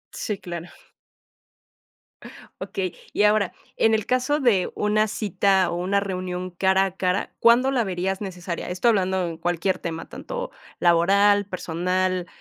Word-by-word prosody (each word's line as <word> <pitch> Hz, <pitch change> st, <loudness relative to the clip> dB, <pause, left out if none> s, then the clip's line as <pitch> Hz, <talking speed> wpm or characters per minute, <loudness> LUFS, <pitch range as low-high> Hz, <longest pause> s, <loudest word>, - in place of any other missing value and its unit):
Sí, 210 Hz, -3 st, -3 dB
claro. 175 Hz, -2 st, -7 dB, 1.9 s
Okey, 185 Hz, -2 st, -3 dB, 0.2 s
y -, -, +2 dB
ahora, 210 Hz, -2 st, +3 dB, 0.3 s
en 225 Hz, -, +3 dB
el 215 Hz, -2 st, +1 dB
caso 255 Hz, +4 st, +1 dB
de 225 Hz, -10 st, +2 dB
una 215 Hz, +1 st, +2 dB
cita 195 Hz, -3 st, +1 dB
o -, -, -2 dB
una 185 Hz, +3 st, +1 dB
reunión 185 Hz, -2 st, -4 dB
cara 190 Hz, +2 st, +2 dB
a 190 Hz, -1 st, -5 dB
cara, 185 Hz, +1 st, -1 dB
¿cuándo 240 Hz, +3 st, +5 dB
la 250 Hz, -3 st, +1 dB
verías 190 Hz, 0 st, -2 dB
necesaria? 180 Hz, -3 st, -5 dB
Esto 180 Hz, +6 st, 0 dB
hablando 190 Hz, -4 st, +1 dB
en 165 Hz, -1 st, -6 dB
cualquier 175 Hz, +2 st, -1 dB
tema, 165 Hz, -1 st, -5 dB
tanto -, -, -6 dB, 0.3 s
laboral, 200 Hz, +4 st, +4 dB
personal, 185 Hz, 0 st, -1 dB
190 Hz, 140 wpm, -24 LUFS, 180-210 Hz, 1.9 s, cuándo